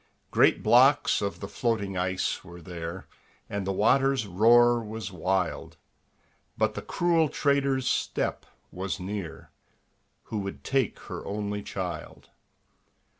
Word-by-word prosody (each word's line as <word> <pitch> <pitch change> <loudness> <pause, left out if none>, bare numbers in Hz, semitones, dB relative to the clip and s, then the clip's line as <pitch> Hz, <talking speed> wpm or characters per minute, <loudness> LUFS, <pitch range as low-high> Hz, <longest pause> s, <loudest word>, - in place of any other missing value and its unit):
Great - - +4
blocks 135 +3 +5
of 100 -1 -3
the 100 - -4
floating 100 -4 -1
ice 90 +1 -1
were 90 -1 -11
there, 85 +1 -7 0.4
And 100 -2 -4
the - - +1
water's 135 +5 +3
roar 120 +5 +5
was 110 -2 -6
wild, 90 0 -2 0.8
But - - +1
the - - -5
cruel 170 -3 +1
trader's 140 -2 +1
step - - -1 0.2
was 95 +2 -4
near, 95 -2 -6 0.7
Who 110 - -4
would 100 -1 -6
take 135 -5 0
her - - -7
only 105 0 -3
child. 90 -5 -6
100 Hz, 125 wpm, -27 LUFS, 95-120 Hz, 0.8 s, blocks